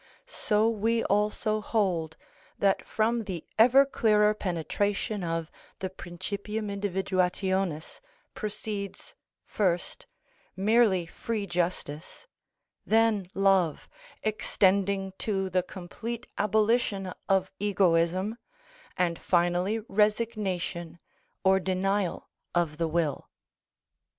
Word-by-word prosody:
So 220 - +1
we 230 +1 +1
also 210 +1 +1
hold 180 -8 0 0.4
that 195 -1 +1
from 225 +1 0
the 180 -5 -5
ever 255 +5 +7
clearer 210 -5 +3
penetration 200 +2 -2
of 165 -1 -2 0.3
the 190 -1 -4
principium 200 +4 -5
individuationis 190 -3 -1 0.3
proceeds, 210 -2 -5 0.3
first, 180 -4 -1 0.5
merely 200 -2 +3
free 210 +4 -4
justice, 175 - -3 0.6
then 220 -3 +2
love, 195 -5 +2 0.4
extending 195 -2 +1
to 195 -3 -1
the 185 0 +3
complete 220 +6 -7
abolition 210 -2 +1 0.2
of 190 -1 +2
egoism, 185 +1 +2 0.6
and 170 -2 +1
finally 175 +4 +1
resignation 200 -5 0 0.5
or 190 0 +5
denial 190 0 -1 0.3
of 165 -3 +1
the 165 - +1
will. 160 -3 -1
195 Hz, 90 wpm, -28 LUFS, 180-215 Hz, 0.6 s, ever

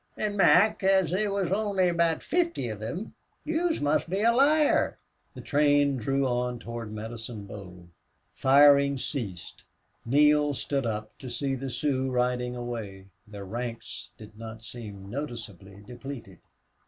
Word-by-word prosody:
An', 210 -1 -1
Mac, 200 +4 +5
as 190 -4 +3
they 200 +4 +1
wus 195 -3 -1
only 200 -2 +1
about 170 -2 +1
fifthy 335 - 0
of 110 -2 -6
thim, 145 - -5 0.3
yez 325 +2 0
must 145 +3 +1
be 190 +3 -1
a 230 - +5
liar." 295 +4 +3 0.4
The - - -8
train 145 -1 +3
drew 135 +4 0
on 125 -1 -1
toward 115 -2 -7
Medicine 110 0 -7
Bow. 90 -3 -10 0.5
Firing 140 0 +5
ceased. 110 - -5 0.4
Neale 145 +3 +4
stood 135 -1 -2
up 110 -1 -4
to 130 - -7
see 135 +3 -2
the 135 +1 -4
Sioux 130 0 -1
riding 125 0 0
away. 110 -6 -6 0.2
Their 100 -2 -8
ranks 115 +3 -6
did 105 -1 -13
not 110 0 -8
seem 105 -5 -9
noticeably 105 -6 -7
depleted. 125 -7 -9
130 Hz, 140 wpm, -27 LUFS, 115-160 Hz, 0.5 s, Mac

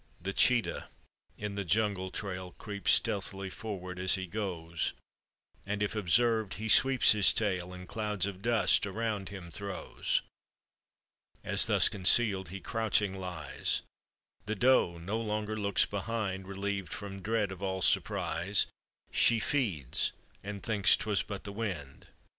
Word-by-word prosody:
The 95 +3 -5
cheetah 120 +2 +2 0.5
in 105 -1 -5
the 100 0 -3
jungle 100 0 0
trail 90 -2 -6
Creeps 100 -2 0
stealthy 100 -3 0
forward 90 -4 -7
as 95 0 +4
he 95 -1 -4
goes, 85 -4 -4 0.7
And, 105 +1 -3
if 105 - -3
observed, 110 +2 +1
he 110 +1 -5
sweeps 130 +2 +6
his 105 -2 +5
tail 90 -4 -1
And 90 0 -10
clouds 105 -2 -2
of 100 -2 -7
dust 110 -3 +3
around 105 -1 -3
him 95 -4 -10
throws. 100 +1 -3 1.2
As, - - +5
thus - - +6
concealed, 95 -1 +5
he 95 +2 -7
crouching 105 -2 0
lies, 90 -4 -3 0.6
The 110 - -2
doe 120 -7 +2
no 95 +7 -4
longer 105 -1 -3
looks 100 -2 +1
behind; 100 -2 -4
Reliev'd 100 -1 -4
from 100 -1 -8
dread 105 -1 -1
of 95 -1 -9
all 95 -1 -2
surprise 95 +4 +1 0.5
She 115 -1 +4
feeds 100 - -1 0.3
and 100 -1 -7
thinks 105 -4 +4
'twas 105 -3 0
but 100 -2 -7
the 100 - -8
wind. 90 -11 -6
100 Hz, 140 wpm, -30 LUFS, 95-110 Hz, 1.2 s, sweeps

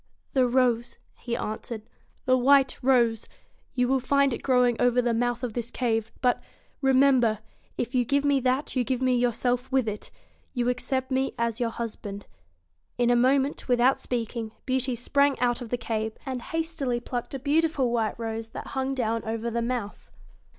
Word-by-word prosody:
'The 260 -2 +4
rose,' 245 -1 +1 0.2
he 235 -1 -3
answered 215 +1 -5 0.2
' - - -39
the 255 - +4
white 265 +1 +4
rose. 235 -4 +2 0.5
You 250 -1 +2
G - - -2
97 270 - +3
find 280 +1 +2
it - - -5
growing 250 -2 +3
over 245 0 +3
the 240 -1 +2
mouth 245 +1 -1
of 240 -3 -2
this 235 0 -4
cave. 225 -3 -1 0.7
remem 270 -1 +5
ber 220 -2 +2 0.4
if 240 +2 -3
you 250 -1 +3
give 280 +4 +1
me 285 -1 +3
that, 260 +3 0
you 255 - +2
give 255 +1 -1
me 255 -1 +2
yourself 245 +1 0
with 260 -3 +2
it 210 0 -5 0.5
You 245 0 +1
accept 260 +1 -2
me 265 +1 0
as 235 0 -1
your 235 -2 +1
husband.' 210 -3 -6 0.7
In 245 0 +3
a - - +4
moment, 265 +3 +2
without 250 +1 +3
speaking, 230 -2 -3
Beauty 260 -1 0
sprang 280 +4 +2
out 245 0 +1
of 240 - -6
the 245 - -1
cave 220 -2 -2
and 260 -2 -4
hastily 320 -5 -2
plucked 240 +2 -5
a - - -1
beautiful 290 -2 +1
white 225 -3 0
rose 225 0 -4
that - - -7
hung 265 0 -1
down 230 -3 -1
over 225 +1 -3
the 235 +1 -1
mouth. 235 -3 -4
245 Hz, 185 wpm, -26 LUFS, 235-265 Hz, 0.7 s, remem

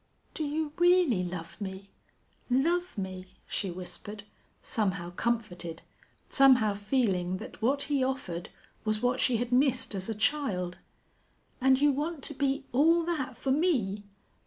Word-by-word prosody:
"Do 315 - -3
you 300 0 -2
really 350 - +4
love 175 +2 -6
me 195 0 -6 0.6
love 335 +6 +1
me?" 190 -1 -5 0.2
she 195 - -2
whispered, 185 +4 -7 0.4
somehow 190 -6 -2
comforted, 175 -6 -2 0.4
somehow 255 -6 +5
feeling 200 -4 0
that 220 - -10
what 275 +5 +2
he 285 -3 +1
offered 225 -10 -3 0.3
was 215 +1 -1
what 250 +1 +2
she 245 -3 +3
had 245 +1 -2
missed 260 -1 +3
as 190 +1 -3
a 225 - -1
child. 210 -8 0 0.8
"And 265 0 +5
you 290 0 +5
want 295 +1 -3
to 295 - -3
be 275 -1 0
all 325 +6 +4
that 330 -6 -2
for 270 - -1
me?" 250 - +1
245 Hz, 140 wpm, -29 LUFS, 195-280 Hz, 0.8 s, somehow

